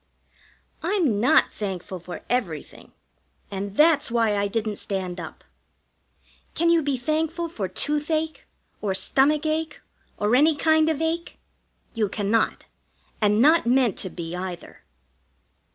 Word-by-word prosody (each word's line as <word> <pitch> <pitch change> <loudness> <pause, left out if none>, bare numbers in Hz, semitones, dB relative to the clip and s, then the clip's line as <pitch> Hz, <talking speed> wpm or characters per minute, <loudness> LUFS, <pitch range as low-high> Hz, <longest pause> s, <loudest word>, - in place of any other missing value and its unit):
I'm 330 - +1
not 240 - +4
thankful 190 -2 -5
for 175 +1 -9
everything, 195 - -3 0.6
and 200 +1 -5
that's 305 -3 +4
why 230 -3 +2
I 200 0 +1
didn't 215 0 -2
stand 185 -2 -3
up. 165 - -9 1.1
Can 335 0 +3
you 335 -1 +4
be 280 -3 -1
thankful 320 +6 -1
for 220 - -4
toothache, 300 - -2 0.3
or 195 -3 -1
stomachache, 305 +9 +1 0.4
or 210 +3 +2
any 300 +4 +5
kind 315 +1 +3
of 320 0 -1
ache? 335 +1 -3 0.5
You 215 -3 0
cannot. 205 +3 0 0.6
And 210 +2 +4
not 310 -3 +5
meant 245 -4 +3
to 190 - -1
be, 170 -1 -6
either. 180 -1 -7
240 Hz, 125 wpm, -24 LUFS, 200-315 Hz, 1.1 s, any